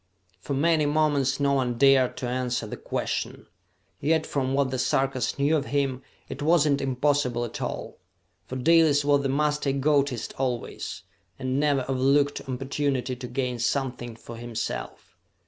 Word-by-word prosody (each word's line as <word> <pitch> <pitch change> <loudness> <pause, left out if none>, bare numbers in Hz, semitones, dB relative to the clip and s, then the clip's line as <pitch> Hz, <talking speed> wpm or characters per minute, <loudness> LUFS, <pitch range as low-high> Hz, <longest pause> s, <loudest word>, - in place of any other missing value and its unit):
For 140 - -4
many 155 +1 +2
moments 145 -3 +1
no 140 0 +2
one 125 -3 0
dared 135 -1 +4
to 125 - -3
answer 125 -1 -1
the 105 - -6
question; - - -3 0.5
yet, 160 +2 +1
from 135 -1 -1
what 140 -2 +1
the 130 - -2
Sarkas 135 0 0
knew 145 +3 +2
of 145 -2 -1
him, 135 -3 0 0.3
it 135 - -7
was 155 +1 +4
not 140 -2 +2
impossible 130 -2 +1
at 120 - -7
all. - - -5 0.5
For 130 - -6
Dalis 150 +1 +4
was 145 -1 +4
the 135 - -1
master 150 +1 +1
egotist 140 -3 +1
always, 125 -3 -3 0.3
and 130 0 -1
never 145 -3 +2
overlooked 140 +2 +2
opportunity 130 0 -1
to 125 0 -7
gain 125 -1 -2
something 120 -1 -2
for 115 0 -10
himself. 120 -1 -5
135 Hz, 155 wpm, -26 LUFS, 125-145 Hz, 0.5 s, dared